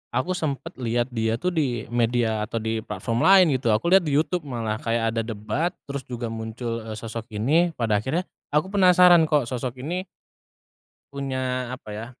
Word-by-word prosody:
aku 130 +9 0
sempet 160 +1 -3
lihat 120 0 0
dia 115 -1 0
tuh 180 +1 0
di 130 -9 -1
media 120 -2 +1
atau 105 - -6
di 110 0 -2
platform 115 0 -3
lain 185 -7 +6
gitu. 125 -2 -2
Aku 110 +10 +1
lihat 190 -1 +6
di 150 -3 0
YouTube, 165 +3 +1
malah 115 -4 -2
kayak 115 -1 0
ada 115 - +1
debat, 115 +10 -2 0.2
terus 140 -1 -4
juga 120 -1 -4
muncul, 115 +1 -4
eee, - - -4
sosok 115 0 -6
ini. 150 +12 +2
Pada 110 -3 +1
akhirnya 145 - -1 0.3
aku 150 +4 +2
penasaran 180 -3 +7
kok 150 -5 +2
sosok 125 0 -4
ini 175 +8 -3 1.1
punya, 130 -2 -3
apa 125 - -11
ya, 110 +2 -6
125 Hz, 175 wpm, -24 LUFS, 115-155 Hz, 1.1 s, penasaran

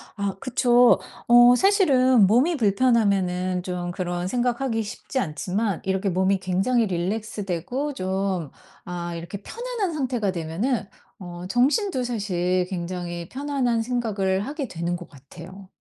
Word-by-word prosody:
아 200 -2 -2
그쵸. 245 -1 +4 0.3
어 240 +1 +8
사실은 260 - +4
몸이 265 - +3
불편하면은 195 -5 +1
좀 180 -1 -4
그런 175 0 -3
생각 245 +3 0
하기 225 -4 0
쉽지 215 +5 -7
않지만 185 - -2
이렇게 190 +1 0
몸이 190 +2 +2
굉장히 195 +6 +1
릴랙스 200 +3 -3
되고 245 - -3
좀 190 - -2 0.3
아 175 -1 -5
이렇게 170 +4 -7
편안한 465 - -4
상태가 250 -9 -1
되면은 190 +8 -2 0.3
어 175 -1 -8
정신도 265 - +1
사실 185 -6 -1
굉장히 175 -1 -5
편안한 265 -4 -1
생각을 210 -5 -1
하게 285 -2 -4
되는 175 0 -3
것 175 - -11
같아요. 170 +8 -13
200 Hz, 290 characters per minute, -24 LUFS, 180-245 Hz, 0.3 s, 어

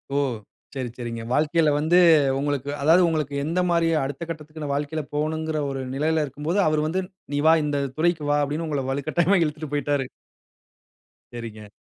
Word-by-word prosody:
ஓ! - - +2 0.6
சரி 130 -3 -3
சரிங்க. 115 -2 -5
வாழ்க்கைல 155 +3 +2
வந்து 160 +4 +3 0.4
உங்களுக்கு 145 -1 -2
அதாவது 165 +5 +5
உங்களுக்கு 155 -3 -1
எந்த 170 +3 -1
மாரி 170 -1 +2 0.2
அடுத்த 140 +5 -5
கட்டத்துக்குன்னு 155 -2 -6
வாழ்க்கைல 150 +2 -2
போகணும்ங்கிற 155 +1 -1
ஒரு 135 -1 -4
நிலைல 155 +2 +1
இருக்கும்போது, 150 +7 -2
அவரு 155 0 +2
வந்து, 185 +4 -1 0.3
"நீ 145 - +1
வா. 160 - +8
இந்த 145 -1 -1 0.2
துறைக்கு 165 -1 +1
வா" 145 - +3
அப்படீன்னு 155 +3 -2
உங்கள 145 -3 -1
வலுக்கட்டாயமா 165 +7 +1
இழுத்துட்டு 150 -1 -4
போய்ட்டாரு. 145 -2 0 1.3
சரிங்க. 110 -3 -8
150 Hz, 150 wpm, -24 LUFS, 140-160 Hz, 1.3 s, வா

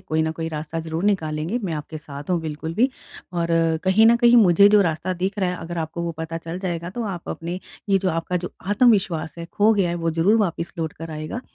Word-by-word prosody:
कोई 160 0 -1
न 160 - 0
कोई 165 0 -4
रास्ता 155 +1 -5
ज़रूर 160 +3 -4
निकालेंगे। 165 +1 0
मैं 170 - -2
आपके 155 +1 -6
साथ 145 +1 -9
हूँ 175 -2 +2
बिल्कुल 160 +1 -5
भी। 250 +6 +3 0.4
और 170 -1 -1 0.4
कहीं 205 +4 +5
न 235 +1 +6
कहीं 240 0 +5
मुझे 200 -2 +7
जो 210 0 +6
रास्ता 170 +2 -1
दिख 190 +4 -3
रहा 180 -2 0
अगर 170 +1 -5
आपको 160 +1 -3
वो 170 -1 -2
पता 160 0 -4
चल 165 +2 -6
जाएगा 175 -2 -3
तो 235 +3 -4
आप 180 -4 -6
अपने 175 +2 -4 0.3
ये 195 -1 +4
जो 190 0 0
आपका 165 +2 -2
जो 180 0 -5 0.2
आत्मविश्वास 200 -8 +2
है 170 - -5
खो 210 +1 +4
गया 190 -4 +2
है 170 - -1
वो 165 -1 -1
ज़रूर 170 +7 +3
वापस 170 -3 -2
लौट 160 -1 -2
कर 165 0 -8
आएगा। 155 +10 -5
170 Hz, 235 wpm, -23 LUFS, 160-195 Hz, 0.4 s, मुझे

